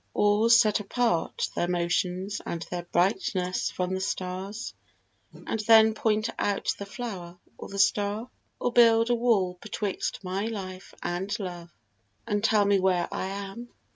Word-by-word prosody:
or 210 Hz, +2 st, +3 dB
set 230 Hz, -3 st, +5 dB
apart 210 Hz, -4 st, 0 dB
Their 175 Hz, -, 0 dB
motions 180 Hz, +3 st, -1 dB
and 170 Hz, -, -4 dB
their 175 Hz, -1 st, -2 dB
brightness 185 Hz, 0 st, +1 dB
from 180 Hz, 0 st, -2 dB
the 190 Hz, -, -2 dB
stars, 190 Hz, +3 st, -4 dB, 0.6 s
And 225 Hz, -, -5 dB
then 220 Hz, 0 st, +6 dB
point 215 Hz, 0 st, +1 dB
out 205 Hz, -1 st, 0 dB
the 200 Hz, -, -6 dB
flower 190 Hz, -6 st, -7 dB, 0.2 s
or -, -, -9 dB
the 200 Hz, -, -7 dB
star? 205 Hz, +3 st, +1 dB, 0.3 s
Or 245 Hz, -, -1 dB
build 230 Hz, 0 st, +5 dB
a -, -, +4 dB
wall 200 Hz, -7 st, +1 dB
betwixt 205 Hz, -1 st, -3 dB
my 190 Hz, +3 st, -2 dB
life 190 Hz, -4 st, -7 dB
and 190 Hz, +4 st, -2 dB
love, 175 Hz, -3 st, -6 dB, 0.6 s
And 205 Hz, 0 st, -1 dB
tell 215 Hz, -2 st, +4 dB
me 200 Hz, -1 st, +3 dB
where 185 Hz, -2 st, +2 dB
I 190 Hz, -, -2 dB
am? 200 Hz, +5 st, -6 dB
200 Hz, 150 wpm, -27 LUFS, 185-220 Hz, 0.6 s, then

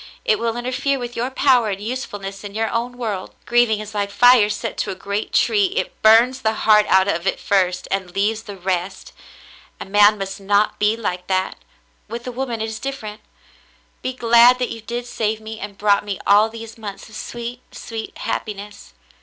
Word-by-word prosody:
It 215 Hz, -1 st, +2 dB
will 230 Hz, 0 st, -1 dB
interfere 255 Hz, +3 st, -1 dB
with 245 Hz, -1 st, -6 dB
your 245 Hz, +2 st, -1 dB
power 255 Hz, -4 st, +3 dB
and 195 Hz, -1 st, -3 dB
usefulness 205 Hz, -4 st, -5 dB
in 205 Hz, 0 st, -8 dB
your 220 Hz, 0 st, -1 dB
own 245 Hz, +1 st, -2 dB
world. 210 Hz, -6 st, -4 dB
Grieving 240 Hz, -3 st, +3 dB
is 215 Hz, 0 st, -8 dB
like 205 Hz, -1 st, -1 dB
fire 235 Hz, +1 st, +5 dB
set 210 Hz, -, -3 dB
to -, -, -1 dB
a -, -, -3 dB
great 200 Hz, +3 st, -4 dB
tree. 410 Hz, -2 st, +3 dB
It -, -, -3 dB
burns 235 Hz, +4 st, +5 dB
the 220 Hz, -3 st, +1 dB
heart 210 Hz, -1 st, +6 dB
out 190 Hz, 0 st, +4 dB
of 170 Hz, -1 st, -1 dB
it -, -, 0 dB
first, 185 Hz, -2 st, +1 dB
and 190 Hz, -2 st, -3 dB
leaves 215 Hz, +3 st, 0 dB
the 205 Hz, -3 st, -9 dB
rest. 185 Hz, +1 st, -3 dB, 0.7 s
A -, -, -6 dB
man 205 Hz, +2 st, +5 dB
must 195 Hz, 0 st, -5 dB
not 205 Hz, +2 st, +1 dB
be 210 Hz, +2 st, +2 dB
like 180 Hz, -5 st, -4 dB
that. 185 Hz, 0 st, -1 dB, 0.5 s
With 235 Hz, +1 st, -7 dB
a 250 Hz, -, -4 dB
woman 240 Hz, -2 st, -3 dB
it -, -, 0 dB
is 220 Hz, 0 st, -6 dB
different. 220 Hz, -6 st, -6 dB, 0.8 s
Be 255 Hz, -, -2 dB
glad 235 Hz, 0 st, +6 dB
that 250 Hz, -1 st, -2 dB
you 225 Hz, -, -7 dB
did 240 Hz, +2 st, -5 dB
save 220 Hz, -2 st, -2 dB
me 220 Hz, 0 st, -8 dB
and 200 Hz, 0 st, -7 dB
brought 205 Hz, -1 st, +3 dB
me 200 Hz, -2 st, -4 dB
all 210 Hz, +2 st, +5 dB
these 225 Hz, 0 st, -10 dB
months 205 Hz, -3 st, -8 dB
of 220 Hz, -, -16 dB
sweet, 240 Hz, +2 st, -6 dB
sweet 225 Hz, -1 st, -7 dB
happiness. 205 Hz, 0 st, -5 dB
220 Hz, 195 wpm, -21 LUFS, 200-235 Hz, 0.8 s, heart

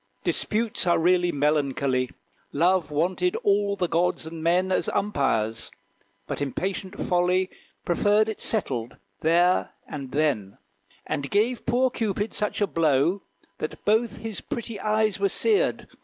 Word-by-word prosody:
Disputes 215 Hz, -3 st, 0 dB
are 175 Hz, -, +4 dB
really 175 Hz, +1 st, +3 dB
melancholy! 140 Hz, -3 st, +1 dB, 0.4 s
Love 170 Hz, +1 st, +2 dB
wanted 180 Hz, +4 st, 0 dB
all 200 Hz, 0 st, +2 dB
the 180 Hz, -3 st, 0 dB
gods 170 Hz, 0 st, 0 dB
and 160 Hz, 0 st, -7 dB
men 180 Hz, +3 st, +2 dB
As -, -, +1 dB
umpires; 115 Hz, -, 0 dB, 0.6 s
but -, -, -4 dB
impatient 190 Hz, +7 st, -3 dB
Folly 180 Hz, +1 st, +1 dB, 0.3 s
Preferred 205 Hz, +4 st, +3 dB
it 220 Hz, -, -5 dB
settled 125 Hz, -, -2 dB, 0.2 s
there 175 Hz, +3 st, +3 dB
and 140 Hz, -3 st, -7 dB
then; 135 Hz, -11 st, 0 dB, 0.5 s
And 140 Hz, -1 st, -3 dB
gave 225 Hz, +4 st, 0 dB
poor 250 Hz, +2 st, +2 dB
Cupid 210 Hz, -1 st, -2 dB
such 210 Hz, 0 st, -1 dB
a -, -, +5 dB
blow, 165 Hz, +1 st, +2 dB, 0.4 s
That -, -, -6 dB
both 220 Hz, +3 st, +2 dB
his 225 Hz, -3 st, -5 dB
pretty 230 Hz, -3 st, -5 dB
eyes 215 Hz, -1 st, +1 dB
were 200 Hz, 0 st, +2 dB
seared. 430 Hz, -, +1 dB
180 Hz, 135 wpm, -25 LUFS, 150-205 Hz, 0.6 s, a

